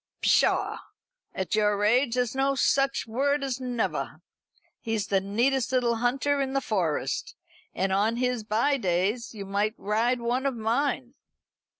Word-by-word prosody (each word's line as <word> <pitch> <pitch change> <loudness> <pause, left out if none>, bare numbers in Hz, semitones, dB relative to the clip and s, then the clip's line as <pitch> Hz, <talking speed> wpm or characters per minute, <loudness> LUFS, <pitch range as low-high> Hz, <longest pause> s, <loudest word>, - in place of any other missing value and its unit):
"Pshaw! - - +2 0.6
At 190 - -3
your 210 -1 +2
age 245 +3 +3
there's 245 -2 0
no 270 +1 +1
such 275 0 +1
word 275 +5 0
as 265 -2 -2
never. 245 -3 -2 0.6
He's 225 -2 -2
the 195 -1 +2
neatest 235 +7 0
little 240 -3 +1
hunter 275 +4 +1
in 265 -1 -2
the 275 - +2
Forest. 185 - -2 0.4
And 190 +1 0
on 210 +4 +2
his 250 -2 0
by 230 +7 +1
days 200 +3 -1
you 200 -2 -6
might 205 +3 -1
ride 230 +5 0
one 245 +3 0
of 270 - -2
mine." 245 +3 -1
235 Hz, 145 wpm, -27 LUFS, 210-265 Hz, 0.6 s, age